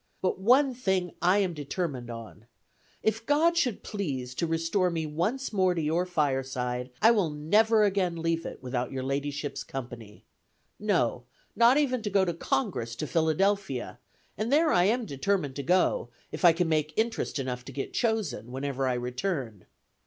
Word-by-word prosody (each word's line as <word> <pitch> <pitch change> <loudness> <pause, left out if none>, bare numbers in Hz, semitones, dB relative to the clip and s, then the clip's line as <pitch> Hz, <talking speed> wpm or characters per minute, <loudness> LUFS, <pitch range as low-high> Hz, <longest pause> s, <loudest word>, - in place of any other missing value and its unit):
But 185 0 -1
one 260 +7 +4
thing 190 -7 0
I 180 +3 +4
am 190 -4 +1
determined 145 -4 -4
on. 115 -1 -9 0.6
If 220 +1 0
God 310 +6 +3
should 250 - 0
please 135 - -4
to 170 - -1
restore 165 +3 +1
me 165 -2 -2
once 200 - -2
more 185 -3 +2
to - - -1
your 165 +4 0
fireside, 130 -6 -1
I 225 - +8
will 205 -8 +2
never 210 +9 +3
again 190 -4 +1
leave 165 0 0
it - - -8
without 125 -1 -2
your 130 -1 -3
ladyship's 145 +2 -3
company 120 -5 -8 0.5
no, 170 - 0 0.3
not 235 +3 +6
even 255 -5 +1
to 210 - -2
go 195 -1 +3
to 175 - -1
Congress 120 -7 -2
to 155 - -3
Philadelphia, 160 -4 0 0.4
and 220 +3 -1
there 310 +2 +4
I 175 - +4
am 235 +4 +1
determined 145 -2 -1
to - - -2
go, 185 - +2 0.2
if - - -6
I 175 - +9
can 170 +1 0
make 155 -1 0
interest 225 -6 -1
enough 125 -2 -3
to 135 - -8
get 135 +1 -5
chosen, 220 - -1
whenever 135 0 -2
I 125 - +1
return. 125 - -3
165 Hz, 170 wpm, -28 LUFS, 135-205 Hz, 0.6 s, I